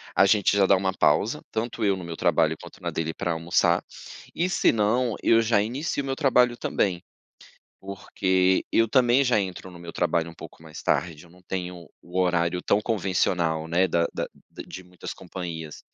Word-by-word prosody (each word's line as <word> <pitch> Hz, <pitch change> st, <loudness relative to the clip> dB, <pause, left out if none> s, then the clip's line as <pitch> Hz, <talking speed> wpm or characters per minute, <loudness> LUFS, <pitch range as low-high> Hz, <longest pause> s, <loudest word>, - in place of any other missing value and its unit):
a 95 Hz, -, +6 dB
gente 100 Hz, 0 st, +3 dB
já 100 Hz, -, +5 dB
dá 95 Hz, -, +5 dB
uma 95 Hz, 0 st, 0 dB
pausa, -, -, +2 dB
tanto 115 Hz, 0 st, -3 dB
eu 100 Hz, -1 st, +3 dB
no 90 Hz, -, -7 dB
meu 85 Hz, -1 st, -6 dB
trabalho 80 Hz, -3 st, +2 dB
quanto -, -, -13 dB
na -, -, -2 dB
dele 80 Hz, 0 st, -3 dB
pra 90 Hz, 0 st, -2 dB
almoçar 80 Hz, +1 st, +1 dB, 0.5 s
e 180 Hz, +2 st, 0 dB
se -, -, +3 dB
não, 115 Hz, +2 st, +1 dB
eu 115 Hz, 0 st, +4 dB
já 115 Hz, -2 st, +2 dB
inicio 140 Hz, +7 st, -2 dB
o -, -, -7 dB
meu 135 Hz, -1 st, -2 dB
trabalho 125 Hz, -4 st, +3 dB
também, 90 Hz, -4 st, -1 dB, 0.8 s
porque 95 Hz, -1 st, 0 dB
eu 115 Hz, 0 st, +3 dB
também 125 Hz, +2 st, +4 dB
já 125 Hz, -4 st, +2 dB
entro 95 Hz, -1 st, -5 dB
no 90 Hz, -, -12 dB
meu 85 Hz, -1 st, -8 dB
trabalho 85 Hz, -1 st, 0 dB
um 85 Hz, -, -11 dB
pouco 80 Hz, -, -12 dB
mais 80 Hz, -1 st, -10 dB
tarde. 85 Hz, -2 st, -1 dB
Eu -, -, -19 dB
não 90 Hz, +2 st, -20 dB
tenho 90 Hz, -2 st, -5 dB
o 90 Hz, +2 st, -4 dB
horário 90 Hz, -1 st, +1 dB
tão 105 Hz, -, +2 dB
convencional, 90 Hz, -6 st, 0 dB
né. 90 Hz, +3 st, +2 dB
Da 85 Hz, 0 st, +1 dB
da -, -, -2 dB, 0.2 s
da -, -, -9 dB
de 95 Hz, -, -9 dB
muitas 90 Hz, 0 st, -8 dB
companhias. 85 Hz, -4 st, -7 dB
95 Hz, 195 wpm, -25 LUFS, 85-110 Hz, 0.8 s, a